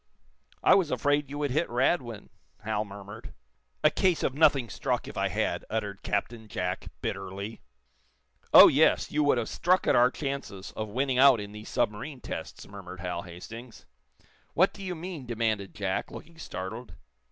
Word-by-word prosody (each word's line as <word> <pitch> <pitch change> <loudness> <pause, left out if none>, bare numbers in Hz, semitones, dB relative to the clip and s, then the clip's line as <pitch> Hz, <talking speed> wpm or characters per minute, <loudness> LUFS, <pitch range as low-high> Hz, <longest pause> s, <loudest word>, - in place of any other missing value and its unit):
"I - - +7
was 185 -5 +3
afraid 145 -1 +1
you 145 - -6
would 145 -2 -1
hit 155 +6 0
Radwin," 120 - 0 0.3
Hal 105 0 -1
murmured. 100 +1 -10 0.5
"A - - +6
case 185 -3 +1
of 130 - +1
nothing 140 -4 +4
struck, - - -2
if - - -8
I - - +1
had!" - - -1
uttered 105 -3 -3
Captain 110 +2 -3
Jack, 90 -3 -3 0.2
bitterly. 100 +2 -5 0.9
"Oh, - - +11
yes! - - +3
You 150 0 +2
would 145 - +4
have 120 - -1
struck 185 +2 +1
at - - +3
our 125 +1 +6
chances 135 -9 -5
of 110 -1 -4
winning 130 +3 0
out 135 -3 +7
in 100 0 -7
these 105 +1 -9
submarine 125 +7 -2
tests," - - -7
murmured 95 -2 -10
Hal 90 -1 -3
Hastings. 110 +8 -10 0.7
"What 185 +3 +4
do 200 - -11
you 185 -2 -3
mean?" 165 -5 -7
demanded 110 -4 -1
Jack, 100 -3 -2
looking 165 -1 -11
startled. 110 - -6
115 Hz, 165 wpm, -28 LUFS, 100-145 Hz, 0.9 s, Oh